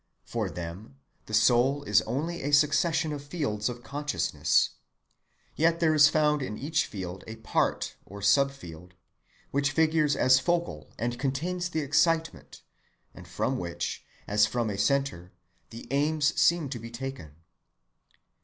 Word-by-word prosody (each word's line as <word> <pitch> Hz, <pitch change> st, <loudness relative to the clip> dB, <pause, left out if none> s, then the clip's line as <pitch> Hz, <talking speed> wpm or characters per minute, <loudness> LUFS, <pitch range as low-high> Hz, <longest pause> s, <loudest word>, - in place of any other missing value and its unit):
For -, -, -3 dB
them 85 Hz, -1 st, -8 dB, 0.3 s
the -, -, -9 dB
soul 130 Hz, +4 st, +3 dB
is 105 Hz, -5 st, +3 dB
only 160 Hz, +9 st, -3 dB
a 145 Hz, -, -2 dB
succession 155 Hz, +2 st, +3 dB
of 145 Hz, -1 st, -6 dB
fields 140 Hz, -9 st, -2 dB
of 120 Hz, 0 st, -8 dB
consciousness: 135 Hz, -, 0 dB, 0.8 s
yet 165 Hz, +2 st, +2 dB
there 160 Hz, -2 st, +3 dB
is 150 Hz, 0 st, +7 dB
found 150 Hz, -1 st, +2 dB
in 105 Hz, -5 st, -4 dB
each 155 Hz, +4 st, -1 dB
field 95 Hz, -2 st, -7 dB
a 110 Hz, -, -7 dB
part, 110 Hz, -1 st, -1 dB
or 100 Hz, +2 st, -11 dB
sub‐field, 100 Hz, -, 0 dB, 0.6 s
which 140 Hz, 0 st, +1 dB
figures 155 Hz, -1 st, +2 dB
as 130 Hz, 0 st, +5 dB
focal 170 Hz, -, -2 dB
and 120 Hz, +2 st, -3 dB
contains 175 Hz, +7 st, -2 dB
the 160 Hz, -2 st, -2 dB
excitement, 165 Hz, +3 st, 0 dB, 0.5 s
and -, -, -13 dB
from 130 Hz, -, -2 dB
which, 85 Hz, -1 st, -4 dB, 0.2 s
as 105 Hz, +1 st, +3 dB
from 115 Hz, 0 st, -1 dB
a 100 Hz, -, -5 dB
centre, 135 Hz, -11 st, 0 dB, 0.4 s
the 115 Hz, -, -10 dB
aim 150 Hz, +3 st, +1 dB
seems 155 Hz, 0 st, +2 dB
to 120 Hz, -, -4 dB
be 115 Hz, +1 st, -8 dB
taken. 120 Hz, -, -7 dB
135 Hz, 145 wpm, -28 LUFS, 105-155 Hz, 0.8 s, is